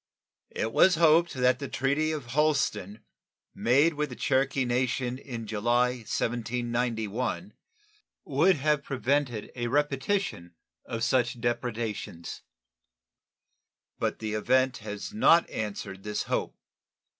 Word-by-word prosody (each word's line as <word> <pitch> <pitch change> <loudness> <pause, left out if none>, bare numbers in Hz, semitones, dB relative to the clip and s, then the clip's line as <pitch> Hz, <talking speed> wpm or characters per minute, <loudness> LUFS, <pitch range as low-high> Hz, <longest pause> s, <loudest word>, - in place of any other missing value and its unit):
It 115 - -2
was 185 -2 +6
hoped 165 +1 +5
that 125 -1 +3
the 140 - -4
treaty 140 +5 0
of 150 -5 -4
Holston, 135 -9 0 0.5
made 140 +7 +3
with 150 0 -2
the - - -7
Cherokee 135 0 +1
Nation 125 +1 -1
in 120 -5 -7
July, 120 +4 +2
1791, 120 - -2 0.7
would 160 +7 +3
have 150 0 +1
prevented 135 -4 -1
a 120 -1 -2
repetition 135 - -1 0.3
of 115 -1 -4
such 120 -1 +1
depredations; 115 -7 -3 1.6
but - - -1
the 110 -1 -4
event 130 +4 +2
has 105 - -7
not 170 -6 +5
answered 100 -3 -5
this 105 +1 -3
hope. - - -2
125 Hz, 110 wpm, -28 LUFS, 115-145 Hz, 1.6 s, was